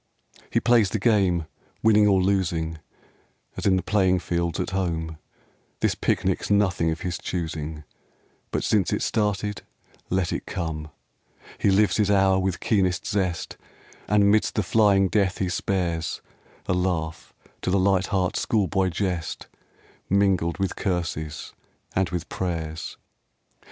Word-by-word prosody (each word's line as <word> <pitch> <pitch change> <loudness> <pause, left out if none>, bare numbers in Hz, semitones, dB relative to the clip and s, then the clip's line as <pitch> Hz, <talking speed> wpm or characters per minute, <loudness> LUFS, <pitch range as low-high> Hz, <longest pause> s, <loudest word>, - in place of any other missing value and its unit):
He - - +2
plays 115 -4 +4
the 110 - -1
game, 95 -6 +2 0.4
winning 105 -1 +5
or 95 -2 +4
losing, 85 -4 0 0.8
As - - -2
in 95 - +5
the 95 - 0
playing 95 -3 +2
fields 85 -1 -2
at - - -2
home; 80 -4 -2 0.6
This - - +2
picnic's - - 0
nothing 95 -5 +2
of 80 0 -3
his 90 -1 -3
choosing, 80 -3 -4 0.7
But - - -2
since 100 -5 +2
it's - - 0
started, 105 -2 -1 0.5
let 95 -2 0
it - - -4
come 80 -4 -4
I 75 - -31 0.2
He - - +3
lives 95 -2 +3
his 105 -2 +2
hour 95 -1 +4
with 95 -2 -1
keenest 95 -4 +1
zest, 95 -5 -2 0.5
And 100 0 +4
midst 110 0 +2
the 105 - +1
flying 100 -1 +4
death 95 -1 +1
he 95 - -1
spares 85 -3 -2 0.4
A - - 0
laugh 90 -3 -2 0.3
to - - -2
the 95 - +3
light 95 0 +2
heart 95 -2 0
schoolboy 95 -3 +1
jest, 90 -3 -3 0.6
Mingled 95 -4 +2
with 95 -1 -1
curses 80 -5 -3 0.4
and 95 -2 +1
with 90 -1 -4
prayers. 80 -3 -4
95 Hz, 140 wpm, -25 LUFS, 85-100 Hz, 0.8 s, winning